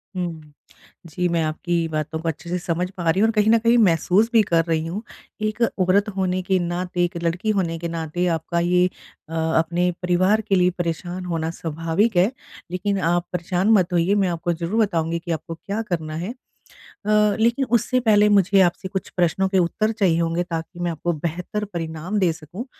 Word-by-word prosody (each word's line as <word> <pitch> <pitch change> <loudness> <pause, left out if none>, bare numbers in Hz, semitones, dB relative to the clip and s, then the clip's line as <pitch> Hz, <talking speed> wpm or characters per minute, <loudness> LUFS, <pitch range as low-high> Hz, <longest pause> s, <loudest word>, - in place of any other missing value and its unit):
हुँ। 160 -4 -5 0.5
जी, 180 +3 -1
मैं 170 -1 +1
आपकी 165 +2 -1
बातों 155 +1 -3
को 165 - -5
अच्छे 160 +2 -7
से 180 - 0
समझ 175 +1 -2
पा 175 -4 -2
रही 180 - +2
हूँ 220 - +5
और - - +1
कहीं 215 0 +3
न 230 - +6
कहीं 230 +1 +3
महसूस 195 +2 +3
भी 225 - +7
कर 165 -3 +2
रही 160 -1 0
हूँ। 185 +6 -4 0.4
एक 215 +2 -2 0.2
औरत 200 +3 +3
होने 185 -1 0
के 190 0 +1
नाते, 175 +1 -2
एक 175 0 -1
लड़की 175 +6 -1
होने 175 -5 0
के 170 - -3
नाते, 165 +1 -2
आपका 170 +1 -1
ये 180 +1 +3 0.4
अ, - - -8 0.2
अपने 175 +2 +1
परिवार 185 +4 +2
के 200 -2 0
लिए 180 0 +4
परेशान 175 +2 -3
होना 165 -2 -2
स्वाभाविक 165 +6 -1
है। 190 +7 +4 0.4
लेकिन 195 +2 -1
आप 175 +1 +1
परेशान 180 +3 0
मत 185 -3 +3
होइए, 175 +4 +2
मैं 195 -3 +2
आपको 170 0 -1
ज़रूर 170 +7 -2
बताऊँगी 165 -3 -1
कि 170 0 -6
आपको 165 +1 -4
क्या 205 +5 -4
करना 165 -7 -4
है। 180 +8 -4 0.5
अ, 210 -1 +1
लेकिन 235 +4 +2
उससे 240 +2 +1
पहले 210 -3 +4
मुझे 200 -1 +4
आपसे 185 +2 +1
कुछ 190 -1 -4
प्रश्नों 180 +2 +2
के 190 - +1
उत्तर 215 +6 +1
चाहिए 190 -7 +2
होंगे 170 +1 0
ताकि 170 0 -6
मैं 175 -1 -1
आपको 170 +2 -2
बेहतर 175 +7 -3
परिणाम 165 +4 -3
दे 180 -4 +3
सकूँ। 170 - -8
180 Hz, 195 wpm, -22 LUFS, 165-200 Hz, 0.5 s, भी